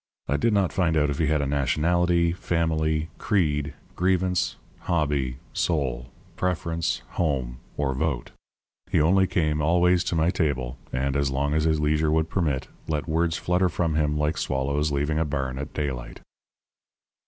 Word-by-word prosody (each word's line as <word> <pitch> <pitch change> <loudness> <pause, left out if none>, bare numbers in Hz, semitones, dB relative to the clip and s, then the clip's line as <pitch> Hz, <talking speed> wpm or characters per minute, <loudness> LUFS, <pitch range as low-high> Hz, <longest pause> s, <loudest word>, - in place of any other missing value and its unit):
I 70 - +1
did 115 +9 +2
not 100 -4 +2
find 85 -4 +2
out 75 -1 +2
if 70 - -4
he 80 - +2
had 75 -1 +2
a - - -1
nationality, 85 +5 +2
family, 80 -2 0
creed, 75 -8 0 0.2
grievance, 90 +1 +1 0.2
hobby, 70 -6 0 0.2
soul, 65 -7 -1 0.3
preference, 85 -2 -1
home, 65 -7 -1 0.2
or 70 -2 0
vote. 70 -2 -2 0.6
He 90 -4 +2
only 95 +5 +4
came 75 -4 0
always 90 +3 +3
to 85 - -1
my 80 +2 +3
table 70 -8 -1
and, 65 +1 -1
as 70 -1 +1
long 70 +2 0
as 80 0 +1
his 80 -1 +2
leisure 75 +1 +2
would 80 +1 +1
permit, 75 -8 0 0.2
let 75 -4 -2
words 80 +1 +1
flutter 90 +1 +1
from 85 -1 0
him 75 -1 +1
like 75 +1 0
swallows 70 +3 0
leaving 75 +2 0
a - - +3
barn 65 -3 -3
at 70 - -5
daylight. 65 -5 -4
75 Hz, 160 wpm, -25 LUFS, 70-85 Hz, 0.6 s, only